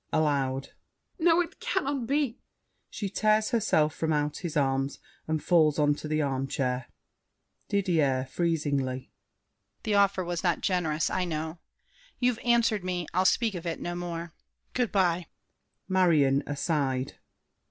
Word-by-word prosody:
[Aloud.] 135 -3 0 0.5
No, 340 +1 +4
it 350 - -6
cannot 290 - -1
be. 275 -3 0 0.5
[She 205 - -4
tears 215 +3 +2
herself 175 - +2
from 160 -1 -1
out 150 -1 0
his 170 -5 -4
arms, 135 0 0 0.3
and 155 -1 -1
falls 155 -4 +4
on 145 -1 +4
the 155 +1 -2
armchair. 135 -2 -1 0.8
DIDIER 155 -10 +1
(freezingly). 140 -6 -1 0.7
The 215 - 0
offer 200 -2 +3
was 175 0 -3
not 175 -2 +1
generous, 165 -5 0
I 185 -1 0
know. 160 0 -4 0.6
You've 245 -2 +1
answered 235 -4 +3
me. 180 -1 -2
I'll 185 +2 +2
speak 225 +2 +3
of 175 -1 -5
it 165 - -3
no 175 - -4
more! 170 -1 -5 0.4
Good 245 -3 0
by! 180 -3 +1 0.6
MARION. 160 -8 +3
(aside). 140 -3 -1
170 Hz, 130 wpm, -28 LUFS, 145-200 Hz, 0.8 s, No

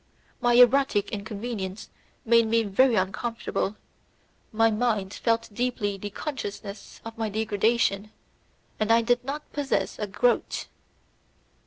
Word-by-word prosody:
My 240 -1 +2
erotic 245 -4 +5
inconvenience 205 -1 -5 0.4
made 230 0 +5
me 230 +1 +2
very 230 +5 +3
uncomfortable, 205 +1 -2 0.8
my 225 0 +3
mind 210 -4 0
felt 230 -2 -1
deeply 240 -3 -1
the 205 +1 -6
consciousness 205 -5 -6
of 225 0 -8
my 220 -1 -1
degradation, 215 -1 +1 0.7
and 215 +1 +1
I 230 0 +5
did 245 +1 +2
not 290 +3 -6
possess 285 -2 -1
a 210 - -2
groat! 240 +4 0
225 Hz, 120 wpm, -26 LUFS, 205-240 Hz, 0.8 s, erotic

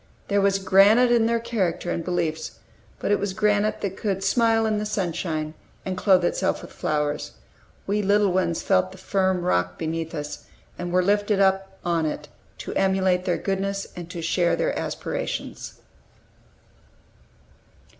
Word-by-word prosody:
There 200 0 +3
was 195 0 +3
granite 200 +6 +5
in 230 -2 +4
their 230 0 +1
character 190 -7 -1
and 170 - -2
beliefs, 160 -2 -2 0.4
but - - -2
it 205 - +3
was 205 -2 -2
granite 210 +1 +1
that 195 -1 -3
could 195 -3 -2
smile 225 +2 +3
in 215 -1 +1
the - - -2
sunshine 170 -6 -2 0.3
and 185 - -2
clothe 185 -2 +4
itself 190 +2 0
with - - -10
flowers. 150 -1 -2 0.5
We 205 +2 0
little 205 0 +3
ones 175 -3 0
felt 185 -1 +2
the 190 - -12
firm 190 -1 0
rock 90 - 0
beneath 165 +1 -3
us, 150 -1 -6 0.3
and 175 0 -5
were 180 +1 +3
lifted 205 +1 +2
up 190 0 +1
on 165 -2 +1
it, 150 -1 -5 0.3
to - - -6
emulate 190 -1 +2
their 180 - +1
goodness, 195 0 -2
and 175 -2 -8
to 170 -2 -6
share 170 +1 +2
their - - -1
aspirations. - - -4
190 Hz, 155 wpm, -24 LUFS, 175-205 Hz, 0.5 s, granite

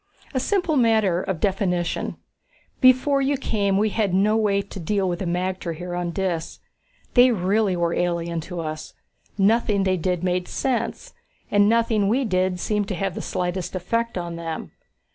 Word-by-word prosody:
"A 260 - +1
simple 355 0 +1
matter 220 -7 +3
of 190 -4 -3
definition. 180 -3 -1 0.6
Before 260 +2 +4
you 275 +1 +1
came 200 -6 0
we 215 +2 +2
had 205 -3 0
no 210 +3 +3
way 200 -3 +2
to 195 - -9
deal 195 +3 0
with 175 -1 -2
the 190 - -3
magter 180 -1 -2
here 175 +2 -6
on 175 0 -2
Dis. 175 -2 -3 0.6
They 250 0 +7
really 200 -1 +1
were 170 -1 0
alien 170 -1 -1
to 175 -2 -4
us. 155 -1 -6 0.4
Nothing 205 0 +3
they 190 -1 +1
did 180 +1 -1
made 180 0 0
sense 260 - -2 0.4
and 205 0 +4
nothing 225 -3 +2
we 255 +4 +1
did 185 -3 0
seemed 210 +1 -1
to 195 - -3
have 195 +1 -2
the - - -5
slightest 180 +1 -3
effect 230 +5 -1
on 170 -1 -4
them. 165 -1 -5
195 Hz, 170 wpm, -23 LUFS, 175-220 Hz, 0.6 s, They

